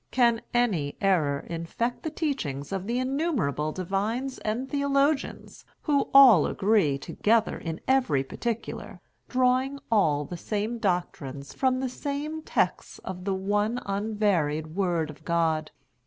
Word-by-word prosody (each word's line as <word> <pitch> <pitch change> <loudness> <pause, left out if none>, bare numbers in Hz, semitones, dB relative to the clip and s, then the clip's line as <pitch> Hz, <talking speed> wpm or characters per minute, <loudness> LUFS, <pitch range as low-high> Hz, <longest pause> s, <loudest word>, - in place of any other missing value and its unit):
Can 235 -3 +3
any 195 -13 0
error 155 -8 +2
infect 170 +9 -3
the 315 - -3
teachings 265 - -3
of 195 0 -3
the 235 +2 0
innumerable 255 - 0
divines 210 - -2
and 230 +5 -2
theologians, 280 0 0 0.2
who 285 -3 +1
all 255 - +8
agree 195 -9 +2
together 220 +10 +1
in 165 -1 -5
every 250 - +2
particular, 230 - -5 0.3
drawing 255 +2 +2
all 150 -9 +3
the 175 - -7
same 215 +6 -3
doctrines 150 -8 -2
from 260 -1 +1
the 265 - 0
same 290 +4 -4
texts - - -1
of 185 -1 -6
the 195 -1 0
one 205 +5 0
unvaried 195 -7 0
Word 175 -5 0
of 150 +1 -17
God? 160 -2 0
205 Hz, 130 wpm, -27 LUFS, 165-255 Hz, 0.3 s, all